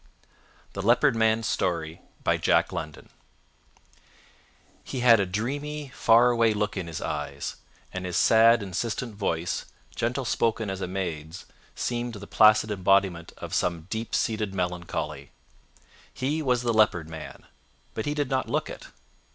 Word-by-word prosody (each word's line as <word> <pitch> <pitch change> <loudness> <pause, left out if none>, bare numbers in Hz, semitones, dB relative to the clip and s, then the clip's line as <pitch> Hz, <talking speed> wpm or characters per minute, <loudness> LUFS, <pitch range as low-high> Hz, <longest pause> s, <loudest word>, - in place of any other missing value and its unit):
THE 100 - -4
LEOPARD 120 +6 +4
MAN'S 110 0 +2
STORY 80 -5 -2 2.8
He 130 - -5
had 115 -3 +7
a 100 - +2
dreamy, 140 +9 -3
far 120 0 +4
away 115 -2 +3
look 105 0 -1
in 95 -3 -4
his 80 -2 -5
eyes, 75 -3 -4 0.4
and 95 - -4
his 90 - -2
sad, 115 0 +5
insistent 110 +5 -3
voice, 90 -5 -2 0.3
gentle - - -1
spoken 110 -3 0
as 95 0 -5
a - - -2
maid's, 85 -3 -5 0.3
seemed 120 -1 -3
the 100 0 -8
placid 110 0 +5
embodiment 95 -3 +1
of - - -8
some 85 -2 0
deep 110 +1 -3
seated 110 -3 -1
melancholy. 85 -5 -3 0.8
He 145 +5 -2
was 125 -4 +1
the 120 -1 +1
Leopard 105 -7 +3
Man, 80 -1 -9 0.5
but 110 - -4
he 145 - -1
did 145 -3 -1
not 130 -1 0
look - - -1
it. - - -10
105 Hz, 135 wpm, -26 LUFS, 90-115 Hz, 2.8 s, had